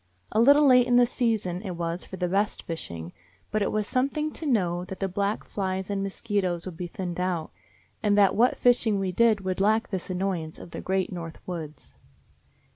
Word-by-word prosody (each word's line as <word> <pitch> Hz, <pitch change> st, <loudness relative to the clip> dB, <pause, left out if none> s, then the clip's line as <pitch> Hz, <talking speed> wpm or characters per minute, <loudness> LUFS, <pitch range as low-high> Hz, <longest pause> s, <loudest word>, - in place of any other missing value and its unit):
A -, -, +1 dB
little 285 Hz, +5 st, +7 dB
late 250 Hz, -2 st, +6 dB
in 245 Hz, -, +3 dB
the 245 Hz, 0 st, +7 dB
season 220 Hz, -7 st, -1 dB
it 190 Hz, -4 st, -5 dB
was 170 Hz, +1 st, -3 dB
for 190 Hz, -, -8 dB
the 180 Hz, 0 st, 0 dB
best 200 Hz, +3 st, 0 dB
fishing, 85 Hz, -, -6 dB, 0.4 s
but 215 Hz, -, 0 dB
it 200 Hz, -, +1 dB
was 215 Hz, -1 st, 0 dB
something 280 Hz, +6 st, 0 dB
to 315 Hz, -, -6 dB
know 180 Hz, -9 st, +1 dB
that 185 Hz, 0 st, -8 dB
the 195 Hz, -, 0 dB
black 200 Hz, +3 st, -1 dB
flies 190 Hz, -1 st, -3 dB
and 200 Hz, -1 st, -1 dB
mosquitos 195 Hz, -3 st, -1 dB
would 185 Hz, -3 st, -6 dB
be 175 Hz, +2 st, -5 dB
thinned 175 Hz, 0 st, -5 dB
out, 180 Hz, -3 st, -1 dB, 0.5 s
and 210 Hz, -2 st, +2 dB
that 200 Hz, -2 st, +5 dB
what 240 Hz, +4 st, +3 dB
fishing 240 Hz, -4 st, +3 dB
we 190 Hz, -1 st, -1 dB
did 220 Hz, +1 st, +3 dB
would 185 Hz, 0 st, -2 dB
lack 220 Hz, +3 st, +2 dB
this 190 Hz, -2 st, -3 dB
annoyance 180 Hz, -4 st, -2 dB
of 170 Hz, -, -11 dB
the -, -, -6 dB
great 190 Hz, 0 st, -1 dB
North 165 Hz, -2 st, -6 dB
Woods. 160 Hz, -5 st, -7 dB
195 Hz, 200 wpm, -26 LUFS, 180-220 Hz, 0.5 s, little